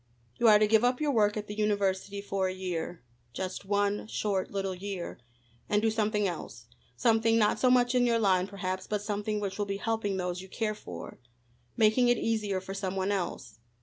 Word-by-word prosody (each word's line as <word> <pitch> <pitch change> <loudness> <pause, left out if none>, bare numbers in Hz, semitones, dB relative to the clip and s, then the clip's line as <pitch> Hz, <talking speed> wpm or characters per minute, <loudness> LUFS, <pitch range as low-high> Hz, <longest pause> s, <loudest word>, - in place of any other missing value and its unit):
You 235 - +4
are 210 -1 +8
to 215 - +4
give 220 +1 +4
up 245 +1 +2
your 300 -2 +1
work 210 -4 +2
at 210 - -3
the 210 - -6
university 200 -1 0
for 195 -1 -1
a 185 - -2
year 175 -3 -4 0.3
just 185 +4 -4
one 205 +1 0
short 200 -3 -1
little 195 -1 -2
year 190 -1 -6 0.5
and 210 - +3
do 220 +1 +2
something 210 -2 +1
else; 135 -9 -6 0.3
something 225 - +3
not 210 -2 +3
so 255 - +4
much 250 0 +4
in 245 -1 +3
your 230 -1 +3
line, 190 -4 +2
perhaps, 190 -2 -4
but 210 -1 -2
something 210 0 -2
which 200 -1 -4
will 205 - 0
be 200 0 -2
helping 210 -2 -1
those 180 -1 -2
you 190 - -11
care 215 +1 -1
for 210 - -9 0.6
making 220 +3 +4
it 240 0 +4
easier 215 -4 0
for 190 +1 -7
some 195 -1 -3
one 190 +1 0
else. 170 - -4
205 Hz, 205 wpm, -29 LUFS, 190-220 Hz, 0.6 s, are